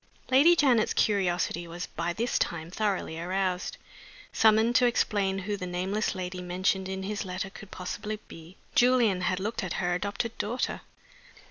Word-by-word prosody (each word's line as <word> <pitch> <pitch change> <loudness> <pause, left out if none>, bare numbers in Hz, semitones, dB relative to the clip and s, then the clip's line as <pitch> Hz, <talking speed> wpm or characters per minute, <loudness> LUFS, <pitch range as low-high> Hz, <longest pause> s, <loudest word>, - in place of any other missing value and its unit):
LADY 295 +7 +7
JANET'S 255 -9 +3
curiosity 180 -4 +1
was 175 +2 -5
by 170 +1 -3
this 235 +7 -1
time 165 0 -2
thoroughly 195 -5 -1
aroused. 185 0 -1 0.6
Summoned 220 +2 +4
to 250 - +5
explain 200 -5 +1
who 200 +2 -2
the 185 -2 -5
nameless 190 +5 -1
lady 180 0 -4
mentioned 185 +1 0
in 190 0 -4
his 210 +2 -3
letter 190 0 -4
could 200 0 -11
possibly 210 +4 -5
be, 165 +3 -12 0.2
Julian 240 -7 +4
had 185 0 0
looked 210 +3 -3
at 180 - -3
her 180 -1 0
adopted 200 +5 -2
daughter. 240 +5 -2
190 Hz, 155 wpm, -28 LUFS, 180-215 Hz, 0.6 s, LADY